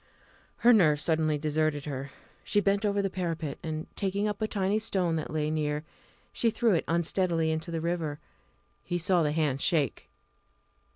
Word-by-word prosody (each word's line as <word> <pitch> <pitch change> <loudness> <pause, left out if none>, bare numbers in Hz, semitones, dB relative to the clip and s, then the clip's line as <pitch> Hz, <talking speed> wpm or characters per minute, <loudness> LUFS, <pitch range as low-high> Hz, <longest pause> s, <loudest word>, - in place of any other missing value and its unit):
Her 245 +1 +6
nerve 155 -9 +4
suddenly 155 -1 +1
deserted 155 -1 0
her. 140 -2 -5 0.3
She 205 - +2
bent 200 +1 +2
over 200 0 +1
the 195 - 0
parapet, 165 -6 -3
and, 160 -2 -4
taking 200 +1 -1
up 210 0 -3
a 215 - +1
tiny 200 0 0
stone 185 -6 0
that 155 - -4
lay 155 0 -1
near, 150 -1 -1 0.5
she 230 - +2
threw 230 -1 +2
it 170 - +1
unsteadily 170 -1 +1
into 160 +2 -3
the 165 -1 -3
river. 165 -3 -2 0.7
He 175 - -2
saw 175 +1 +2
the 150 -2 +1
hand 150 -4 0
shake. 155 -5 +1
165 Hz, 170 wpm, -29 LUFS, 155-195 Hz, 0.7 s, Her